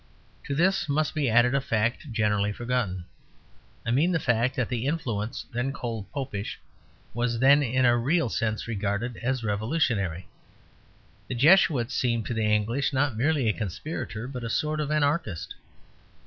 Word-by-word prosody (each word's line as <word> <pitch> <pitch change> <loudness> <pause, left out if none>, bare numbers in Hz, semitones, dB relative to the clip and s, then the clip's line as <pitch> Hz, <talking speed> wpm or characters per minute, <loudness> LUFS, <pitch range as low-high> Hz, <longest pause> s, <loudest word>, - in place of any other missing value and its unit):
To 140 - -2
this 185 +1 +2
must 150 +1 +1
be 145 -5 0
added 120 +3 +4
a 140 - +2
fact 115 +3 -1
generally 105 -2 +1
forgotten. 115 -6 -2 0.8
I 115 - 0
mean 150 +9 +3
the 165 - +1
fact 120 -1 +1
that 130 -3 0
the 125 +1 -2
influence 115 -9 -2
then 125 +3 -1
called 115 -6 -5
Popish 130 -8 -4 0.5
was 120 0 -1
then 140 +4 +6
in 130 -1 +1
a 120 0 +5
real 140 +6 +1
sense 110 -1 -2
regarded 105 +2 -2
as 130 0 -2
revolutionary. 105 - -1 1.0
The - - -4
Jesuit 140 -3 +4
seemed 120 -2 0
to - - -3
the 110 -2 +1
English 115 +7 +1
not 135 -2 +1
merely 140 +1 +1
a 105 - +3
conspirator 110 - -5
but 125 -2 -6
a 115 - -3
sort 155 +6 -1
of 150 -1 -2
anarchist. 145 - 0
120 Hz, 160 wpm, -26 LUFS, 110-140 Hz, 1.0 s, then